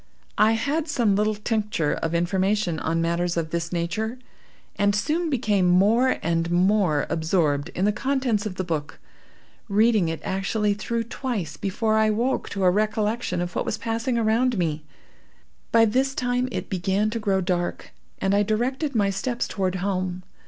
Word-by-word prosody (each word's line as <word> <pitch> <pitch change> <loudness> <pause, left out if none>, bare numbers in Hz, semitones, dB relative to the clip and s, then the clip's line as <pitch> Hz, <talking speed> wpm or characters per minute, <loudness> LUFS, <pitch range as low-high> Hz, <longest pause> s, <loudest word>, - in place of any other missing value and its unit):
I 215 +1 +5
had 290 +8 -1
some 235 -9 +2
little 210 +1 +1
tincture 210 -7 -1
of 165 +1 -2
information 185 0 0
on 165 +1 0
matters 170 +1 0
of 160 -1 -2
this 170 0 -2
nature, 215 +8 -2 0.6
and 205 0 +2
soon 320 +10 0
became 210 -9 +1
more 210 +8 +4
and 165 0 0
more 180 -3 +2
absorbed 160 -2 0
in 185 - +1
the 210 - +3
contents 245 -3 0
of 185 - -6
the 185 - -2
book, 160 -4 -4 0.7
reading 210 -3 +3
it 165 - -3
actually 205 +2 0
through 230 +3 -2
twice 220 - -4
before 215 +4 0
I 220 - +4
awoke 235 +5 0
to 195 -1 -3
a 180 - +5
recollection 215 0 0
of 175 0 -4
what - - 0
was 215 - -2
passing 230 +2 -2
around 230 +2 +2
me. 155 -4 -1 0.9
By 225 0 +6
this 265 +5 +1
time 250 0 0
it - - -4
began 195 +3 0
to 230 - -2
grow 200 -3 +1
dark, 175 -1 -2 0.3
and 195 0 0
I 200 - +4
directed 250 +7 -1
my 200 -2 +2
steps 240 +5 -2
toward 190 -2 -1
home. 185 -1 -2
205 Hz, 165 wpm, -24 LUFS, 175-225 Hz, 0.9 s, By